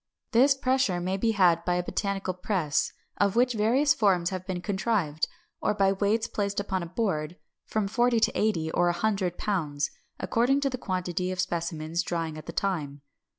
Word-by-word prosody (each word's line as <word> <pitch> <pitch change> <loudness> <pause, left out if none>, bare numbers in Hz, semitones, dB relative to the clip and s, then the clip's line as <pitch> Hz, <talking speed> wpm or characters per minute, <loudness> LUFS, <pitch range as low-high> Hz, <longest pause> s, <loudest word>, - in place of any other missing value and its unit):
This 265 +4 +5
pressure 260 -8 +1
may 185 +2 -1
be 225 +3 +1
had 175 -4 +4
by 180 - +1
a 180 - 0
botanical 195 0 -2
press, 180 -5 0 0.3
of 200 0 +2
which 250 +1 +3
various 240 +7 +3
forms 185 -5 +2
have 185 0 -5
been 185 -2 -2
contrived; 190 -5 0 0.3
or - - +1
by 195 -1 +3
weights 210 +3 +1
placed 200 -1 -2
upon 195 -2 -2
a 170 - -5
board, 170 -5 -2 0.3
from 215 -2 0
forty 240 +2 +2
to - - +4
eighty 165 -7 0
or 175 +1 +2
a - - +1
hundred 190 -3 0
pounds, 150 -8 -1 0.3
according 250 +4 +2
to 275 -1 0
the 255 - -4
quantity 180 -2 -2
of 185 - -5
specimens 170 -2 -1
drying 165 -2 -3
at 155 - -10
the - - -4
time. 155 -7 -2
190 Hz, 185 wpm, -27 LUFS, 175-215 Hz, 0.3 s, This